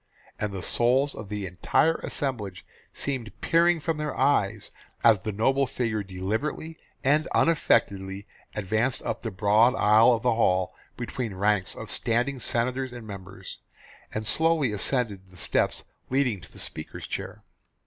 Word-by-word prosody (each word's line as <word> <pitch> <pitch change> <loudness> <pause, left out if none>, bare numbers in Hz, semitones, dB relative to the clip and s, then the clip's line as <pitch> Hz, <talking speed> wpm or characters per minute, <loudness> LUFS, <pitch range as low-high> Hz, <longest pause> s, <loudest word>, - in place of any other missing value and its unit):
And 105 -1 -2
the 95 -2 -5
souls 130 +4 +2
of 105 - -8
the 105 -1 -3
entire 95 - +2
assemblage 105 - -4 0.3
seemed 125 -7 -4
peering 170 0 +3
from 160 +1 -2
their 150 -2 -3
eyes - - +1 0.3
as 110 -5 +6
the 110 - -3
noble 135 +6 +2
figure 115 -4 -1
deliberately 110 - -3 0.2
and 150 +4 +3
unaffectedly 100 -11 +2 0.3
advanced 110 +5 0
up - - -3
the 115 - -3
broad 110 +5 +4
aisle 110 +3 +6
of 115 - -6
the 125 - +3
hall 95 -5 +2 0.2
between 115 -6 -4
ranks 100 0 +1
of - - -7
standing 120 +4 0
senators 125 +2 0
and 120 -2 -8
members, 95 -3 -9 0.5
and 110 0 -4
slowly 160 -2 +3
ascended 105 -3 -2
the 90 - -17
steps - - 0 0.3
leading 125 -7 +1
to 85 - -14
the - - -15
speaker's 80 - -6
chair. - - -6
115 Hz, 150 wpm, -26 LUFS, 100-135 Hz, 0.5 s, as